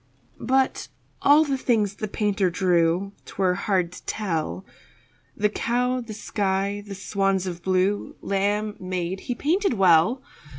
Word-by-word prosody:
But 265 +2 +1 0.3
all 295 +2 +6
the 275 -2 -1
things 215 -6 +1
the 215 - -3
painter 205 -2 0
drew 175 +1 +1
'Twere 185 -2 0
hard 185 -2 0
to - - -11
tell 185 -2 -3 0.7
The 210 - +3
cow, 250 +4 0
the 225 -3 -8
sky, 200 -1 -1
the 200 -1 -8
swans 195 -1 0
of 175 -2 -5
blue, 190 +3 0
Lamb, 205 +2 -1
maid, 185 0 -3
he 245 - -4
painted 355 - +1
well. 190 +6 +4
200 Hz, 135 wpm, -24 LUFS, 185-220 Hz, 0.7 s, all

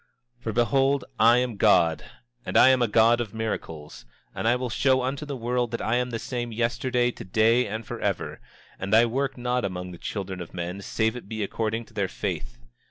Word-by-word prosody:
27:23 120 - -32
For 115 - -1
behold, 135 +4 +2
I 115 +2 +6
am 125 -3 -1
God; 85 -8 +4 0.4
and - - -1
I - - +8
am 130 -1 +4
a 120 - +3
God 115 +2 +4
of 110 -2 -6
miracles; 80 -9 -5 0.3
and - - -2
I 120 - +4
will 125 -1 -3
show 130 +1 +2
unto 135 +3 -3
the 140 -2 -4
world 120 0 -1
that 115 - -4
I 110 +3 +1
am 125 0 -1
the 115 - -3
same 120 0 -4
yesterday, 120 +2 0
today, 115 +4 +2
and 110 +2 -5
forever; - - -3 0.4
and 100 +3 +1
I 115 +2 +7
work 135 +3 -2
not 125 0 -1
among 90 -2 -4
the 85 - -11
children 95 -3 -5
of 85 - -9
men 90 +3 -4
save 110 +3 0
it 120 -5 -9
be 110 -1 -3
according 110 +3 -2
to - - -21
their 100 -2 0
faith. - - -5
115 Hz, 210 wpm, -26 LUFS, 105-125 Hz, 0.4 s, I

